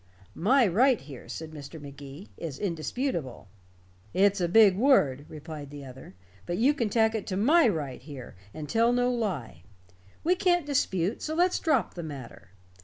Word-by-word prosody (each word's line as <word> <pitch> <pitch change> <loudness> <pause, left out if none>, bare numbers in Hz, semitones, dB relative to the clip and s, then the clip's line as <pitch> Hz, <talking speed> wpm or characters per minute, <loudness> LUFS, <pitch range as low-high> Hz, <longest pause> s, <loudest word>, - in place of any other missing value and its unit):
"My 245 - +3
right 235 +6 +3
here," 135 -3 -12
said 160 -1 -6
Mr. 150 +1 -9
Magee, 140 +4 -10
"is 155 -5 -6
indisputable." 170 - -3 0.7
"It's 195 0 +3
a 175 - +2
big 200 +1 +6
word," 155 - +3
replied 155 -2 -8
the 145 -1 -9
other, 130 -6 -12 0.3
"but 175 0 -2
you 265 +6 +4
can 235 -6 -1
tack 220 +1 +2
it 220 -3 -4
to 185 - -2
my 295 - +5
right 145 - -3
here, 135 -3 -10 0.2
and 150 +4 -7
tell 230 +5 +3
no 245 0 +2
lie. 175 - -3 0.6
We 350 - +3
can't 350 -3 +2
dispute, 200 - 0
so 310 - -3
let's 355 +2 +2
drop 275 - +1
the 175 - -6
matter. 140 - -9
180 Hz, 170 wpm, -28 LUFS, 145-240 Hz, 0.7 s, big